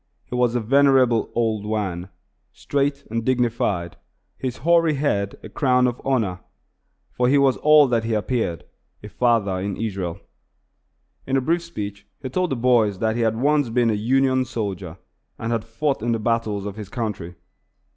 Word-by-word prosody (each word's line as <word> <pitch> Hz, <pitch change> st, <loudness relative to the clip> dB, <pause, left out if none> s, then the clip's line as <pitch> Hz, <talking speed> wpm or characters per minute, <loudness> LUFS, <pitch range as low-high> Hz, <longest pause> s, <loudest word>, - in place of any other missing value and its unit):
He -, -, -10 dB
was 125 Hz, -1 st, +1 dB
a -, -, +2 dB
venerable 130 Hz, -1 st, +3 dB
old 110 Hz, -3 st, 0 dB
Wan, 100 Hz, -4 st, -3 dB, 0.4 s
straight 140 Hz, 0 st, -1 dB
and 115 Hz, 0 st, -1 dB
dignified, 115 Hz, -9 st, 0 dB, 0.4 s
his 130 Hz, -2 st, -4 dB
hoary 165 Hz, -2 st, +4 dB
head 100 Hz, -9 st, -1 dB
a -, -, -8 dB
crown 125 Hz, -2 st, +2 dB
of 125 Hz, -1 st, -2 dB
honor; 110 Hz, -9 st, 0 dB, 0.7 s
for 125 Hz, 0 st, +1 dB
he 145 Hz, -, +4 dB
was 135 Hz, -2 st, +4 dB
all 150 Hz, -1 st, +6 dB
that 115 Hz, -2 st, +1 dB
he 115 Hz, -1 st, -1 dB
appeared 105 Hz, -5 st, -1 dB, 0.4 s
a 105 Hz, -, -8 dB
father 105 Hz, -3 st, +1 dB
in 100 Hz, +1 st, -3 dB
Israel. 95 Hz, -6 st, -3 dB, 1.1 s
In 135 Hz, 0 st, +1 dB
a -, -, +4 dB
brief 170 Hz, +6 st, +1 dB
speech 100 Hz, -11 st, -7 dB
he 130 Hz, -, -6 dB
told 180 Hz, +6 st, 0 dB
the 135 Hz, -, -1 dB
boys 115 Hz, -5 st, +2 dB
that 110 Hz, +2 st, 0 dB
he 120 Hz, -, -1 dB
had 110 Hz, -1 st, +1 dB
once 145 Hz, -1 st, +2 dB
been 115 Hz, 0 st, +2 dB
a -, -, +1 dB
Union 130 Hz, +4 st, +2 dB
soldier, 100 Hz, -8 st, -5 dB, 0.4 s
and 115 Hz, +1 st, -4 dB
had 115 Hz, -2 st, -1 dB
fought 135 Hz, +3 st, -2 dB
in 120 Hz, +1 st, 0 dB
the 115 Hz, -, -1 dB
battles 110 Hz, -3 st, -1 dB
of 105 Hz, 0 st, -6 dB
his 105 Hz, -3 st, -7 dB
country. 105 Hz, -8 st, -4 dB
115 Hz, 175 wpm, -22 LUFS, 105-130 Hz, 1.1 s, all